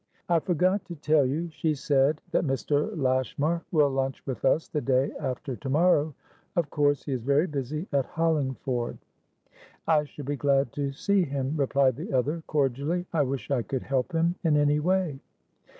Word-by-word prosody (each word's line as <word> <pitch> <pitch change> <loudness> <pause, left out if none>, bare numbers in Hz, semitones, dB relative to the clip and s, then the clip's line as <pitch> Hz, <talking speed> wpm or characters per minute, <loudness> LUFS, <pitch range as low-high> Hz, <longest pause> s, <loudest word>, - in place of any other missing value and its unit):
"I 170 -1 +4
forgot 185 +4 +1
to 175 - -7
tell 150 -2 +3
you," 165 +6 -2
she 155 0 -1
said, 140 +1 +2
"that - - +2
Mr. 145 +1 0
Lashmar 135 +5 0
will 150 -4 +4
lunch 135 0 -2
with 130 -3 -5
us 150 +4 +2
the 150 - -2
day 130 0 +1
after 130 -2 -3
to 135 +2 -6
morrow. 155 -1 +3 0.4
Of 165 -5 0
course 145 -1 +2
he 145 - -5
is 130 -3 -1
very 140 +6 +2
busy 150 +1 -3
at 140 -3 +1
Hollingford." 135 -6 -1 0.9
"I 155 -2 +3
shall 145 -1 -10
be 145 +1 -2
glad 135 -1 +2
to 140 -1 -2
see 200 +8 +1
him," 140 -3 -2
replied 135 -3 +2
the 155 -1 -6
other, 145 +6 0
cordially. 145 +5 0
"I 160 - +3
wish 135 0 -3
I 130 -3 +2
could 130 +2 -4
help 135 +5 -1
him 165 +1 +2
in 155 -3 +3
any 145 0 +3
way." 175 -3 0
145 Hz, 180 wpm, -27 LUFS, 135-160 Hz, 0.9 s, I